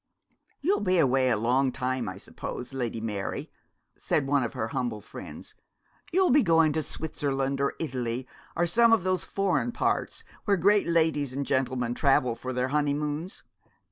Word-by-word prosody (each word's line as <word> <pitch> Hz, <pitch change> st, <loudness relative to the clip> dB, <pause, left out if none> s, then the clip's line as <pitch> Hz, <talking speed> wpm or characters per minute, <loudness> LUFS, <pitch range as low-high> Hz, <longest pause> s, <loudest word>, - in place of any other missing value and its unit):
'You'll 370 Hz, +8 st, +2 dB
be 185 Hz, -2 st, +1 dB
away 130 Hz, -4 st, +3 dB
a 115 Hz, -, +2 dB
long 130 Hz, +4 st, +2 dB
time, 130 Hz, -3 st, -2 dB
I 95 Hz, -, -7 dB
suppose, 125 Hz, +5 st, -7 dB
Lady 120 Hz, -4 st, -2 dB
Mary?' 105 Hz, -3 st, -4 dB, 0.4 s
said 145 Hz, -, 0 dB
one 140 Hz, 0 st, +2 dB
of 120 Hz, -, -3 dB
her 110 Hz, -, -3 dB
humble 120 Hz, -4 st, -2 dB
friends; 105 Hz, -, -10 dB, 0.6 s
'you'll 370 Hz, -1 st, +3 dB
be 285 Hz, +3 st, +6 dB
going 165 Hz, -, +4 dB
to 155 Hz, -, 0 dB
Switzerland 140 Hz, -3 st, -2 dB
or 140 Hz, -, 0 dB
Italy, 125 Hz, -4 st, -3 dB, 0.3 s
or 175 Hz, -, +2 dB
some 230 Hz, +7 st, +5 dB
of 220 Hz, -, +3 dB
those 185 Hz, -1 st, 0 dB
foreign 195 Hz, +4 st, 0 dB
parts -, -, -1 dB, 0.2 s
where 200 Hz, -2 st, +3 dB
great 200 Hz, +3 st, +3 dB
ladies 160 Hz, -5 st, +1 dB
and 140 Hz, +1 st, -2 dB
gentlemen 130 Hz, -3 st, 0 dB
travel 135 Hz, -2 st, +3 dB
for 125 Hz, +3 st, -6 dB
their 125 Hz, +1 st, -1 dB
honeymoons?' 150 Hz, +3 st, -1 dB
140 Hz, 165 wpm, -27 LUFS, 125-170 Hz, 0.6 s, be